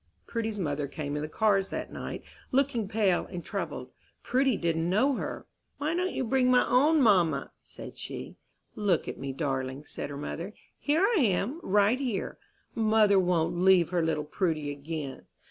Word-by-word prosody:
Prudy's 225 -2 -3
mother 145 -5 -2
came 145 0 -4
in 150 - -2
the 155 - -4
cars 195 +1 +2
that - - -5
night, - - -6 0.3
looking 255 -5 +1
pale 200 -4 +1
and 175 -1 -7
troubled. 155 -10 -4 0.3
Prudy 260 -2 +2
did 170 -1 0
not 165 +1 0
know 245 +10 +3
her. - - -5 0.3
"Why 295 +3 -1
don't 365 +2 0
you - - 0
bring 255 +1 +2
my 250 0 +4
own 295 +3 +4
mamma?" 185 -8 +3
said - - -11
she. - - -7 0.4
"Look 200 -6 0
at - - -5
me, 135 - -4
darling," 135 0 -3
said - - -6
her 140 - -6
mother, 170 +7 -5 0.2
"here 310 +6 +2
I 435 -2 +2
am, 235 - +1
right 205 - +3
here. 245 -8 -3 0.3
Mother 215 -3 +4
won't 175 -1 +1
leave 185 -2 +5
her 175 -2 +1
little 160 -2 0
Prudy 155 -2 -1
again." 145 -1 -6
190 Hz, 175 wpm, -28 LUFS, 160-240 Hz, 0.4 s, leave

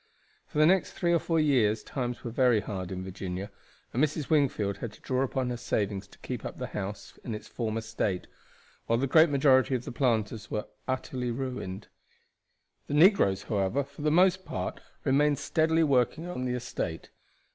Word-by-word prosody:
For - - -7
the 155 - +6
next 185 +3 +3
three 175 -1 +1
or 170 - +4
four 165 +1 0
years 120 -8 +3
times 125 -3 -4
were 120 - -4
very 125 -2 +4
hard 95 -3 -5
in 95 0 -4
Virginia, 95 +1 -5 0.4
and 130 - +2
Mrs. 155 -1 -1
Wingfield 120 -10 +2
had 115 +1 -5
to - - -17
draw 130 0 0
upon 130 -1 -1
her 120 - -3
savings 100 -4 -2
to - - -18
keep - - -6
up - - -6
the - - -3
house 100 0 -6
in 115 - -4
its 105 - -9
former 115 -1 -3
state; 110 -4 -2 0.6
while 115 - +3
the 130 - +1
great 155 +4 +6
majority 135 -2 +4
of 125 - -3
the - - -5
planters 110 -5 0
were 105 - -2 0.2
utterly 130 -1 -2
ruined. 120 -6 -4 1.0
The 145 - -2
negroes, 150 - +5
however, 105 +6 0
for 140 +2 -13
the 150 - +2
most 185 +3 +4
part - - -4 0.2
remained 145 +2 +3
steadily 160 +3 +2
working 140 +2 +2
on 130 -8 -4
the 125 0 -1
estate. 85 -9 -4
125 Hz, 185 wpm, -29 LUFS, 105-145 Hz, 1.0 s, the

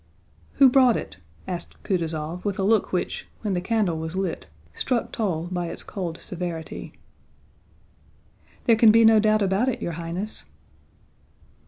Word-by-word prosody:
"Who 275 - +7
brought 255 -2 +5
it?" - - -7 0.3
asked 175 -2 -6
Kutúzov 165 -2 -2
with 200 -2 -2
a 195 - -1
look 215 +1 +2
which, 180 - -2 0.2
when 205 -3 0
the 175 - 0
candle 195 -5 0
was 160 +2 -5
lit, 190 - -3 0.3
struck 240 - -1
Toll 175 -7 -2
by 175 -1 -2
its 165 - -6
cold 175 -4 -5
severity. 175 -4 -6 1.7
"There 230 - +6
can 225 0 +7
be 230 +1 +6
no 220 -1 +7
doubt 215 0 +3
about 195 +6 +2
it, 255 - -3
your 170 - -3
Highness." 170 +5 -5
190 Hz, 150 wpm, -24 LUFS, 170-220 Hz, 1.7 s, Who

